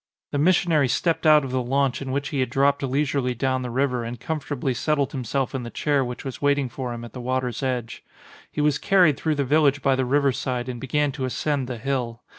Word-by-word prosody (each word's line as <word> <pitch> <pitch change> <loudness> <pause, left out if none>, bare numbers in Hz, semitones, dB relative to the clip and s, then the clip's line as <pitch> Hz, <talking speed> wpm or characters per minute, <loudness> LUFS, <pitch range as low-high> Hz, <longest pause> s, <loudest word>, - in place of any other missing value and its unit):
The 145 - -1
missionary 165 -3 +3
stepped 160 +6 +1
out 150 -2 +6
of 130 - -5
the 130 0 0
launch 135 +2 0
in 135 -1 -4
which 140 +1 -2
he 140 - -2
had 130 - +1
dropped 140 +2 +2
lei 135 +2 +1
surely 130 -3 -1
down 130 +1 0
the 125 - -4
river 125 -1 0
and 115 0 -6
comfortably 145 -2 -2
set 150 +5 0
tled 140 -2 0
himself 135 0 -2
in 135 - -2
the 120 - -6
chair 145 +2 +1
which 125 +1 -6
was 135 - -6
waiting 140 -2 +2
for 125 0 -5
him 120 0 -6
at 120 - -12
the 125 - -7
water's 125 -1 -2
edge. 125 -4 -3 0.5
He 150 - -2
was 150 -1 +2
carried 180 -7 +4
through 155 +2 -1
the 140 - 0
village 145 0 +3
by 135 -1 +3
the 130 - 0
river 140 +2 +2
side 125 -1 -3
and 125 -2 -5
began 145 +2 0
to 135 -2 -4
ascend 135 +1 -1
the 125 -2 -4
hill. 120 -2 -3
135 Hz, 240 wpm, -24 LUFS, 125-145 Hz, 0.5 s, out